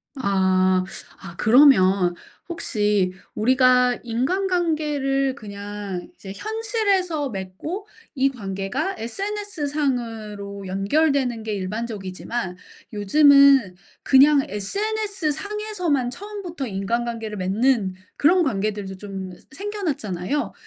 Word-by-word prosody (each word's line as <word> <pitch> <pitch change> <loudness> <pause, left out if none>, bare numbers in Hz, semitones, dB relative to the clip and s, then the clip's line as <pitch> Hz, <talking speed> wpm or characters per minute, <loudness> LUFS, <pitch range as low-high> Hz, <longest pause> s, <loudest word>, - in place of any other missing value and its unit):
아. 185 -5 +2 0.4
아 185 -2 -9
그러면 195 -8 +5 0.3
혹시 210 - 0 0.2
우리가 250 +1 +4
인간관계를 290 -1 0
그냥 205 -4 -7
이제 195 -8 -9
현실에서 405 - -1
맺고 220 - -6 0.3
이 270 +1 +3
관계가 230 - -3
SNS상으로 245 - -3
연결되는게 230 +2 0
일반적이지만 200 0 -4 0.4
요즘은 275 -1 +5 0.3
그냥 280 +2 +6
SNS상에서만 395 - -2
처음부터 360 -2 -6
인간관계를 225 +2 -3
맺는 200 +1 +1 0.2
그런 355 +5 +4
관계들도 205 -5 -2
좀 195 -1 -6
새 265 - -16
생겨났잖아요. 275 - -2
245 Hz, 240 characters per minute, -23 LUFS, 200-305 Hz, 0.4 s, 그냥